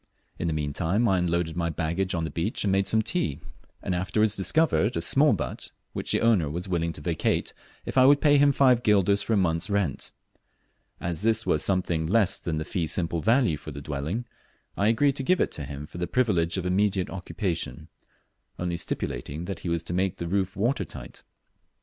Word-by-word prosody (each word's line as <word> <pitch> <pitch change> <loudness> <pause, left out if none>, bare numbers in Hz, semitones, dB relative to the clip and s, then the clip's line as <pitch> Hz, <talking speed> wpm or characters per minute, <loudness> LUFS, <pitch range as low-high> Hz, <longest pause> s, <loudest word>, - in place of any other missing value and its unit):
In 85 - -1
the 80 - 0
meantime 80 +9 0
I 95 -3 +3
unloaded 85 -2 -1
my 85 -1 -1
baggage 85 +4 -1
on 85 - -1
the 80 - -3
beach 85 +7 -2
and 100 - +1
made 95 0 +1
some 110 0 +2
tea, 95 - -1 0.4
and - - -1
afterwards 100 +4 +1
discovered 115 - +2
a - - +1
small 135 - +5
but 100 - -3 0.2
which - - -3
the - - +2
owner 105 -10 +3
was 85 +5 -4
willing 85 -2 -1
to - - -9
vacate 80 +1 -1 0.3
if - - 0
I 130 - +7
would 145 +1 +6
pay 145 -1 +4
him 145 0 +5
five 130 -3 +4
guilders 100 -2 +3
for 115 - -1
a - - +3
month's 85 -2 +1
rent. 100 -9 -1 0.9
As 85 -2 -3
this 115 0 +2
was 75 - +1
something 90 -4 0
less 100 0 +2
than 80 -2 -3
the 80 - -3
fee 85 -3 -2
simple 85 0 -1
value 115 - +2
of 75 - -7
the - - -5
dwelling, 75 - -4 0.5
I 100 - +1
agreed 135 +5 +2
to 135 - -2
give 185 +6 +2
it - - 0
him 70 -1 -6
for 85 - -10
the 90 - -2
privilege 90 -8 +1
of 90 - -3
immediate 95 0 +1
occupation, 90 - -4 0.7
only 90 -1 -2
stipulating 80 -1 -4
that 95 -2 -5
he 90 - -5
was 85 0 -1
to 85 - -5
make 95 0 0
the 85 - -4
roof 95 +1 -1
water 115 +1 +1
tight. 85 - -9
90 Hz, 205 wpm, -26 LUFS, 85-110 Hz, 0.9 s, I